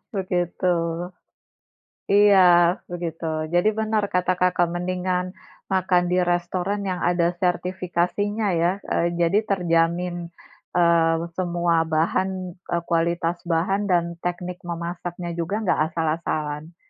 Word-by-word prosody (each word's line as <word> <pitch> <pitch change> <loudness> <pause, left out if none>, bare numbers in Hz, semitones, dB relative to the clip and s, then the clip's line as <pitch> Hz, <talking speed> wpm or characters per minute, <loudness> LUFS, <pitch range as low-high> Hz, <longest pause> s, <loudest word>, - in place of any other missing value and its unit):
begitu. 180 -1 0 1.4
Iya, 205 -1 +6 0.5
begitu. 170 -2 -5 0.3
Jadi, 175 +4 +4
benar 220 -1 +1
kata 180 0 +1
Kakak 180 -1 +2
mendingan 180 +1 -2 0.4
makan 185 -1 +2
di 180 - +3
restoran 180 +3 -1
yang 185 -2 -2
ada 175 0 +2
sertifikasinya 185 +3 -1
ya, 170 +2 +3 0.2
eee, 170 - +2
jadi 175 +4 +3
terjamin, 175 -1 0 0.5
eee, 170 -1 +4 0.2
semua 175 -1 +1
bahan, 165 +4 +1 0.3
eee, 170 -1 -3
kualitas 170 +1 0
bahan 190 +5 0
dan 175 -3 +3 0.2
teknik 180 +1 -4
memasaknya 175 +1 -5
juga 200 +6 -2
enggak 190 - +1 0.2
asal-asalan, 155 -1 -2
175 Hz, 105 wpm, -23 LUFS, 170-185 Hz, 1.4 s, Iya